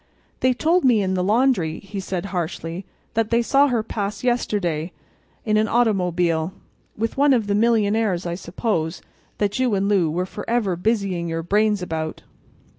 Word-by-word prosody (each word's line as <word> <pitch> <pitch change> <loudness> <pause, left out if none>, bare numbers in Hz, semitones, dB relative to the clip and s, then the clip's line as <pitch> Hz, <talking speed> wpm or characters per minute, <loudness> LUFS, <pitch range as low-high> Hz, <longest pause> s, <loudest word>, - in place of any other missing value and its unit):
"They 255 0 +3
told 330 +6 +2
me 235 -6 +4
in 190 0 0
the 180 -1 0
laundry," 210 -6 +2
he 200 0 -7
said, 185 -1 -3
harshly, 170 +1 -4 0.3
"that 225 -1 0
they 235 0 +2
saw 280 +4 +4
her 240 -5 0
pass 205 -1 -4
yesterday—in 205 -2 -2
an 215 +1 +2
automobile. 180 -7 +1 0.4
With 225 +3 -2
one 285 0 +5
of 230 -4 +2
the 200 - 0
millionaires, 215 -4 +2
I 170 - -2
suppose, 170 -1 -2 0.3
that 205 +3 -1
you 250 -5 +2
and 195 0 0
Lou 190 -6 +2
were 175 +4 -1
forever 205 0 -1
busying 185 -3 -1
your 165 0 -3
brains 210 +2 +2
about." 160 -2 -4
200 Hz, 160 wpm, -22 LUFS, 175-225 Hz, 0.4 s, one